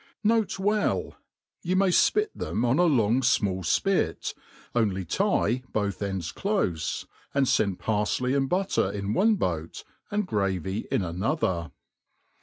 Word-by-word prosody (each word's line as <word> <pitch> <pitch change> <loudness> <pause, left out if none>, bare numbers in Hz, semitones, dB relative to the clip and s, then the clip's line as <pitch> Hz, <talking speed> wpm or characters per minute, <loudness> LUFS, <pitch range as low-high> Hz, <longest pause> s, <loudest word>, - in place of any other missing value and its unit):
N. 225 0 +5
B. 205 +1 0 0.5
You 180 +2 -1
may 195 0 +3
fpit 420 - +3
them 110 - -2
oji 125 +5 +2
a 175 -1 +5
lon^ 115 -4 +3
fmall 105 -7 +2
fpit, 175 - 0 0.4
only 100 -6 0
tie 115 +8 +1
both 100 -2 -1
ends 95 -4 -3
clofe; 95 - -1 0.3
and 140 -2 +3
fend 100 -6 +2
parfley 110 +5 0
and 135 -1 +1
butter 185 - +1
in 100 0 -3
one 215 - +4
boat, 85 - -3 0.3
and 210 0 0
gravy 100 - -2
in - - +1
another. 90 - -1
110 Hz, 135 wpm, -26 LUFS, -, 0.5 s, N